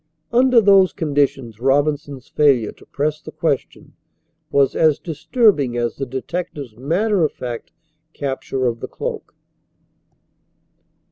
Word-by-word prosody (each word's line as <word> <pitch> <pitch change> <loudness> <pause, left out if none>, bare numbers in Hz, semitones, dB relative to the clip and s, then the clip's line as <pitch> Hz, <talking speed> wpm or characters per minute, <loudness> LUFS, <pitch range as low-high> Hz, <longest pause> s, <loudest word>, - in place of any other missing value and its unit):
Under 250 0 +5
those 195 -2 +5
conditions 140 - -1
Robinson's 140 0 0
failure 135 -7 +2
to - - -20
press 150 +2 -2
the 155 - -9
question 155 -5 -3 0.6
was 140 -2 +2
as 155 -3 +4
disturbing 160 - +1
as 120 -1 -2
the 135 - -3
detective's 130 -1 -5
matter 175 - +1
of 155 - +1
fact 120 -2 -6 0.4
capture 135 -2 -3
of 115 -1 -1
the - - -5
cloak. - - -6
145 Hz, 120 wpm, -20 LUFS, 130-165 Hz, 0.6 s, Under